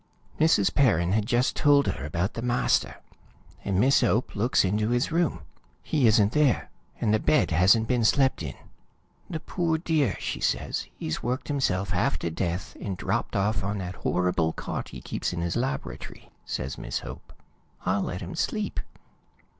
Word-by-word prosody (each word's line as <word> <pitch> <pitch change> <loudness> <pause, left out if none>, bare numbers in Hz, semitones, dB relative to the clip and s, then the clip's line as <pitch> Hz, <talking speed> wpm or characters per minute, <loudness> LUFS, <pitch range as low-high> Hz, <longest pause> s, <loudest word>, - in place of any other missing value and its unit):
"Mrs. 155 -11 +4
Perrin 95 - +3
had 105 +1 +1
just 125 0 +1
told 145 -1 +4
her - - -3
about 85 +7 -2
the 115 - -5
master, 125 +1 +1 0.7
and 95 -2 0
Miss 135 +5 +4
Hope 120 0 +1
looks 110 +1 +2
into 105 +3 0
his 120 +5 +1
room. 170 0 +1 0.4
He 140 -6 +2
isn't 105 -2 +4
there, 150 -2 +2 0.3
and 105 - +1
the 110 - +3
bed 150 -6 +2
hasn't 95 +7 +4
been 120 -1 +1
slept 135 +4 +3
in. - - -5 0.7
'The 160 -2 -4
poor 170 -3 0
dear,' 155 - +1
she - - -3
says, - - -1
'he's 80 - -3
worked 125 +5 -3
himself 100 -10 0
half - - +1
to 85 - -3
death, 90 +4 -3
and 95 -3 -4
dropped - - -2
off 100 0 +1
on 100 +1 -2
that 90 -2 -5
horrible 90 -3 0
cot - - -5
he - - -9
keeps - - -3
in 85 - -3
his 85 0 -2
laboratory,' 70 - -4
says 65 +1 -4
Miss - - -3
Hope. - - -10 0.5
'I'll 95 +2 +1
let 90 -1 -4
him - - -6
sleep.' - - -2
110 Hz, 170 wpm, -26 LUFS, 90-130 Hz, 0.7 s, Mrs